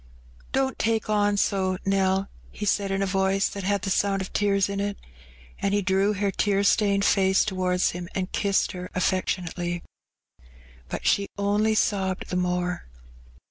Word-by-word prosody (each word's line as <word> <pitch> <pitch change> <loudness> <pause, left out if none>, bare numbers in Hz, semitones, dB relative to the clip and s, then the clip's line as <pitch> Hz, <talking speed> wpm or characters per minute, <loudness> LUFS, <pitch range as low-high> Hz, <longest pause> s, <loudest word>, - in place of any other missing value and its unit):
" - - -26
Don't 265 0 0
take 220 -1 0
on 205 -1 +2
so, 190 -2 +1
Nell," 195 0 +1 0.2
he 210 - -5
said, 200 0 +1
in 195 0 0
a 195 0 -1
voice 195 +1 +2
that 200 - -6
had 200 +1 0
the 195 - -1
BOiud 195 0 +1
of 190 - -6
tears 200 -2 +2
in 200 0 -3
it. 200 0 -2 0.6
And 200 0 +1
he 205 - +1
drew 195 +3 +2
her 200 0 0
tear 200 0 +1
stained 200 -1 +3
face 190 -1 +3
towards 185 -3 +1
him 175 0 -7
and 185 -1 -2
kissed 200 -1 +1
her 180 0 -7
affectionately. 175 -1 -1 1.1
Bat - - -5
she 200 0 +2
only 205 +2 +1
sobbed 190 -3 0
the - - -1
more. 180 0 -1
195 Hz, 170 wpm, -25 LUFS, 185-200 Hz, 1.1 s, stained